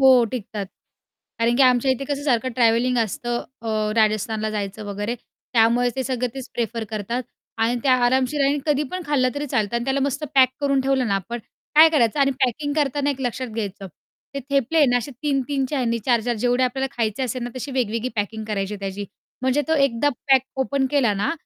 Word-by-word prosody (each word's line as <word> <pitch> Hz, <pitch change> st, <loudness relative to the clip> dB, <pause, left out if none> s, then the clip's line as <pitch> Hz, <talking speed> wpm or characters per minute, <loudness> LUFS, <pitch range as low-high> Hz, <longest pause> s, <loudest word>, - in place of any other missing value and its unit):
हो, 260 Hz, -2 st, +7 dB
टिकतात. 210 Hz, -4 st, -5 dB, 0.7 s
कारण 230 Hz, +1 st, +2 dB
की 275 Hz, -, +5 dB
आमच्या 255 Hz, 0 st, +4 dB
इथे 260 Hz, +1 st, -1 dB
कसं 285 Hz, -1 st, -2 dB
सारखं 255 Hz, -3 st, +1 dB
ट्रॅव्हलिंग 240 Hz, +1 st, +3 dB
असतं 240 Hz, +2 st, -1 dB, 0.2 s
अ, 230 Hz, -, -4 dB, 0.3 s
राजस्थानला 215 Hz, 0 st, +1 dB
जायचं 210 Hz, 0 st, -4 dB
वगैरे 205 Hz, +3 st, -3 dB, 0.4 s
त्यामुळे 235 Hz, +1 st, +4 dB
ते 265 Hz, -, 0 dB
सगळं 250 Hz, -1 st, -1 dB
तेच 265 Hz, -2 st, -7 dB
प्रिफर 230 Hz, -1 st, -2 dB
करतात 220 Hz, +4 st, -3 dB, 0.4 s
आणि 230 Hz, +2 st, +1 dB
त्या 260 Hz, -2 st, +4 dB
आरामशीर 260 Hz, +4 st, +1 dB
आहे 275 Hz, 0 st, +4 dB
आणि 290 Hz, 0 st, 0 dB
कधी 295 Hz, -1 st, +2 dB
पण 365 Hz, 0 st, -4 dB
खाल्लं 270 Hz, -4 st, +2 dB
तरी 290 Hz, +1 st, -3 dB
चालतं 235 Hz, -5 st, 0 dB
आणि 235 Hz, -, -2 dB
त्याला 270 Hz, +1 st, 0 dB
मस्त 280 Hz, +2 st, -1 dB
पॅक 260 Hz, -2 st, +7 dB
करून 275 Hz, -1 st, +2 dB
ठेवलं 265 Hz, -1 st, +1 dB
ना 200 Hz, -, +1 dB
आपण, 195 Hz, +5 st, -3 dB, 0.4 s
काय 315 Hz, +2 st, +9 dB
करायचं 280 Hz, -3 st, +2 dB
आणि 275 Hz, 0 st, +4 dB
पॅकिंग 290 Hz, +4 st, -2 dB
करताना 290 Hz, -1 st, +1 dB
एक 270 Hz, -1 st, -4 dB
लक्षात 255 Hz, 0 st, -2 dB
घ्यायचं. 205 Hz, -3 st, -5 dB, 0.5 s
ते 275 Hz, -, -3 dB
थेपले 275 Hz, +3 st, +1 dB
आहे 295 Hz, -, +6 dB
ना 245 Hz, -1 st, +3 dB
असे 245 Hz, +3 st, -3 dB
3-3 275 Hz, -1 st, 0 dB
च्या 290 Hz, -, -1 dB
ह्यांनी 235 Hz, -2 st, 0 dB
4-4 240 Hz, -1 st, +2 dB
जेवढे 245 Hz, +3 st, +1 dB
आपल्याला 265 Hz, +2 st, -1 dB
खायचे 225 Hz, +1 st, -1 dB
असेल 255 Hz, 0 st, -2 dB
ना, 240 Hz, -, -4 dB
तशी 255 Hz, +3 st, -5 dB
वेगवेगळी 235 Hz, -1 st, -1 dB
पॅकिंग 215 Hz, +1 st, -2 dB
करायची 200 Hz, -1 st, -2 dB
आहे 205 Hz, -, -9 dB
त्याची 195 Hz, +1 st, -4 dB, 0.4 s
म्हणजे 260 Hz, +3 st, +2 dB
तो 320 Hz, -, +3 dB
एकदा 255 Hz, +2 st, 0 dB, 0.2 s
पॅक 265 Hz, -2 st, +6 dB, 0.2 s
ओपन 265 Hz, 0 st, +1 dB
केला 270 Hz, -7 st, +3 dB
ना, 200 Hz, +10 st, 0 dB
250 Hz, 205 wpm, -22 LUFS, 225-275 Hz, 0.7 s, काय